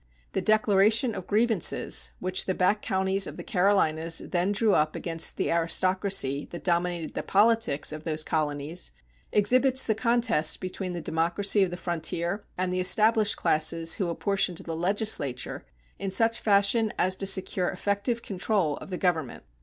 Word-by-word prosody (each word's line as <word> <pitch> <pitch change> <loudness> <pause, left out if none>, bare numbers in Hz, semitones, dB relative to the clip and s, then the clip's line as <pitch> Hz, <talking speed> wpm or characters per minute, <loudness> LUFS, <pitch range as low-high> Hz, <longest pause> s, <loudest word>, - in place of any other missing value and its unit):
The - - -2
Declaration 215 +2 +3
of 185 -3 -7
Grievances 220 -3 0
which 185 +1 -1
the 185 - 0
back 200 +3 +1
counties 190 0 0
of - - -9
the - - -7
Carolinas 165 -4 +1
then 180 +2 -1
drew 210 0 +2
up 155 0 +1
against 165 -1 -2
the - - -1
aristocracy 170 -3 +1
that 170 - -9
dominated 175 -2 -1
the - - -3
politics 215 -8 +2
of 155 0 -8
those 155 -1 -1
colonies 155 +2 -2 0.4
exhibits 255 +5 +3
the 220 - +1
contest 230 -9 +1
between 185 0 -5
the 175 - -5
democracy 175 +7 +1
of 190 - +2
the 175 - -6
frontier 170 +2 -2 0.2
and 180 0 -1
the 185 - -1
established 215 +3 +3
classes 165 +1 +2
who 190 -5 -2
apportioned 190 0 -1
the 165 -1 -5
legislature 175 - -1 0.3
in 195 - -3
such 225 +4 +2
fashion 210 +2 +3
as 185 +1 +2
to 195 - -3
secure 190 -1 +1
effective 200 +5 -2
control 185 -5 -1
of 180 -2 -7
government. 165 -8 -1
185 Hz, 155 wpm, -26 LUFS, 165-205 Hz, 0.4 s, Declaration